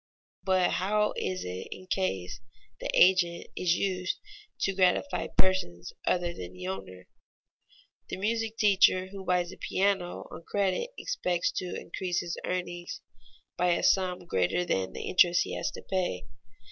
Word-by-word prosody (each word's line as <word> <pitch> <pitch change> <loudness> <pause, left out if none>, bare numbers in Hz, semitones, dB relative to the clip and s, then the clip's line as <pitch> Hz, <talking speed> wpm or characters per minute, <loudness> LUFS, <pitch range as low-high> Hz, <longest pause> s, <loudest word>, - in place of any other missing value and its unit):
But 185 -1 +3
how 210 +3 +1
is 185 0 -2
it 90 +1 -5
in 185 - -8
case 95 - -2 0.4
the - - -4
agent 180 -2 +5
is 175 -2 +2
used 185 -1 -1 0.4
to 195 - +2
gratify 185 +9 +2
persons 90 - +1
other 175 -1 +1
than 90 - -8
the 90 0 -8
owner? 95 -1 -7 1.0
The - - -3
music 225 +2 -1
teacher 190 -2 +4
who 195 0 -8
buys 180 -1 +1
a - - -11
piano 190 -2 0
on - - -8
credit 200 - 0
expects 180 - 0
to 180 - -3
increase 180 -2 -2
his 170 -1 -4
earnings 175 -1 -3 0.6
by 180 0 +3
a - - -1
sum 180 -2 +2
greater 95 - +1
than 95 - -1
the - - -5
interest 175 -1 +5
he - - -6
has - - -1
to - - -9
pay. 180 - -1
180 Hz, 150 wpm, -29 LUFS, 170-190 Hz, 1.0 s, agent